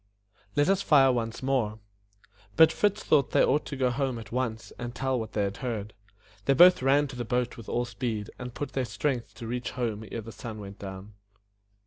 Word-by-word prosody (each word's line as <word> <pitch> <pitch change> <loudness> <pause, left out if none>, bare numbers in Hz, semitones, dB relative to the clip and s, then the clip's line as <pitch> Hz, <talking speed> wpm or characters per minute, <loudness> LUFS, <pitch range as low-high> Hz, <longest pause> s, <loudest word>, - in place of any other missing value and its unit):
Let 145 0 +3
us 195 0 +3
fire 140 -8 +5
once 115 -1 -3
more." 125 -6 0 0.8
But 160 +5 +7
Fritz 205 +4 +1
thought 140 -4 +2
they - - +5
ought 145 +3 +1
to 140 - -5
go 130 -2 +1
home 130 -1 -1
at 115 - -9
once 115 -3 -3
and 120 0 -5
tell 130 +2 -1
me - - -1
what 110 - -6
they 105 - +1
had 100 0 -2
heard. 110 -5 -4 0.5
They 135 - +3
both 180 +3 +8
ran 140 +3 +4
to 135 - -8
the 120 - -3
boat 125 +1 -1
with 115 - -10
all 120 +1 0
speed, 115 -4 -4
and 125 -1 -6
put 145 +4 -5
out - - -24
their 130 -2 0
strength 120 +3 -2
to 115 - -8
reach 125 +2 -3
home 115 -4 -3
ere 115 - -3
the 115 +1 -9
sun 110 +1 -7
went 100 -1 -9
down. 95 +1 -8
120 Hz, 220 wpm, -28 LUFS, 110-135 Hz, 0.8 s, both